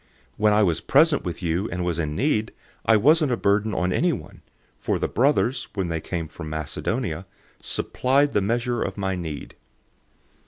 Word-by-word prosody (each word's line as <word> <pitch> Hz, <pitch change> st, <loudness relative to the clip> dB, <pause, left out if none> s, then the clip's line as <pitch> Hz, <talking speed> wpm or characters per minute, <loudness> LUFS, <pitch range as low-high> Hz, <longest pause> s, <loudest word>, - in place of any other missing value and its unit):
011:009 -, -, -39 dB
When 105 Hz, 0 st, +3 dB
I 105 Hz, +1 st, +4 dB
was 85 Hz, -5 st, +1 dB
present 150 Hz, +1 st, +4 dB
with 90 Hz, 0 st, -5 dB
you 85 Hz, +5 st, 0 dB
and 90 Hz, 0 st, -3 dB
was 85 Hz, -1 st, -1 dB
in 75 Hz, -2 st, -2 dB
need, 115 Hz, -, 0 dB, 0.3 s
I 110 Hz, -, +6 dB
wasn't 150 Hz, +5 st, +4 dB
a -, -, 0 dB
burden 105 Hz, +1 st, +1 dB
on 90 Hz, 0 st, 0 dB
anyone, 170 Hz, -6 st, -1 dB, 0.4 s
for -, -, 0 dB
the -, -, -1 dB
brothers, 130 Hz, 0 st, +1 dB
when 95 Hz, -4 st, -1 dB
they 80 Hz, -1 st, -2 dB
came 85 Hz, -2 st, -4 dB
from 80 Hz, 0 st, -8 dB
Macedonia, 80 Hz, -, -3 dB, 0.3 s
supplied 140 Hz, +3 st, +1 dB
the 100 Hz, -, +3 dB
measure 120 Hz, +3 st, 0 dB
of 95 Hz, -, -3 dB
my 95 Hz, -1 st, -1 dB
need. 80 Hz, -5 st, -6 dB
100 Hz, 180 wpm, -24 LUFS, 85-125 Hz, 0.4 s, I